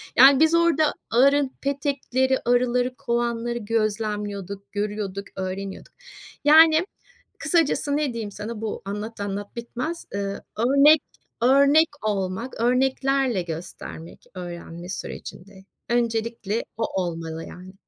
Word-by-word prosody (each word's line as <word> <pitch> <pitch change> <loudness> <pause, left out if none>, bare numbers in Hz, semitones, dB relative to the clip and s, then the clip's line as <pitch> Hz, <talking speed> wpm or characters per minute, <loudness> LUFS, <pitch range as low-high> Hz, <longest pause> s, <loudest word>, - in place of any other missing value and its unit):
Yani, 270 +2 +8
biz 320 +1 +5
orada 330 -3 +3 0.2
arı 275 +3 +4
petekleri, 270 -2 0
arıları, 245 +1 +2
kovanları 235 0 -1
gözlemliyorduk, 210 -3 -3
görüyorduk, 205 -1 -3
öğreniyorduk. 190 +1 -5 0.5
Yani, 315 +2 +7 0.5
kısacası, 295 -4 +1
ne 295 -4 -1
diyeyim 220 -3 -5
sana, 215 +2 -6
bu 220 - -4
anlat, 210 +3 -5
anlat 200 +1 -5
bitmez. 250 +8 -5
Iıı, 200 0 -3 0.2
örnek, 280 +6 +6 0.4
örnek 280 +5 +5 0.2
olmak, 205 +4 -2
örneklerle 260 -2 +2
göstermek 165 0 -8
öğrenme 175 -1 -8
sürecinde, 190 0 -8 0.2
öncelikle 230 -2 -1
o 205 -4 -1
olmalı 165 -2 -5
yani. 185 +1 -11
230 Hz, 105 wpm, -24 LUFS, 200-270 Hz, 0.5 s, Yani